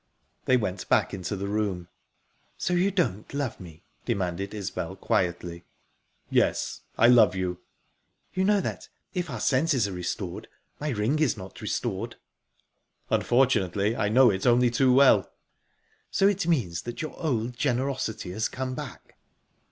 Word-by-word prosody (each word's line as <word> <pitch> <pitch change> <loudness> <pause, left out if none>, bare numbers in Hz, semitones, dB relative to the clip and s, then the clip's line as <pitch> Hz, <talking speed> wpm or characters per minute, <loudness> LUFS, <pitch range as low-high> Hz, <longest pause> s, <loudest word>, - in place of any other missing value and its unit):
They 130 - +4
went 95 -5 -3
back - - +3
into 95 +1 -3
the 100 0 -4
room. 100 -4 -2 0.7
"So 180 - -1
you 180 +3 +3
don't 165 - -1
love 140 -5 -2
me?" 85 -4 -12 0.2
demanded 95 +1 -2
Isbel 105 -3 -4
quietly. 85 -1 -1 0.6
"Yes, - - +1 0.2
I 115 - +5
love 115 -6 +6
you." 90 -1 -2 0.7
"You 185 - 0
know 205 0 +3
that, - - -5 0.2
if 180 -4 -2
our 125 -5 -5
senses 130 -2 +2
are - - -5
restored, 90 0 -4 0.3
my 150 - -2
ring 120 +4 0
is 140 -8 +2
not 95 -1 -10
restored?" - - -3 1.0
"Unfortunately, 110 -5 +2
I 100 - 0
know 125 +1 +6
it 95 +4 -1
only 120 0 +4
too 130 +2 +3
well." 135 +1 +5 0.8
"So 195 - +3
it 195 -4 0
means 105 - 0
that 120 +5 -6
your 155 - -5
old 125 -6 -1
generosity 125 -6 -1
has 110 +5 -1
come 130 0 -4
back?" - - -9
115 Hz, 145 wpm, -27 LUFS, 95-135 Hz, 1.0 s, love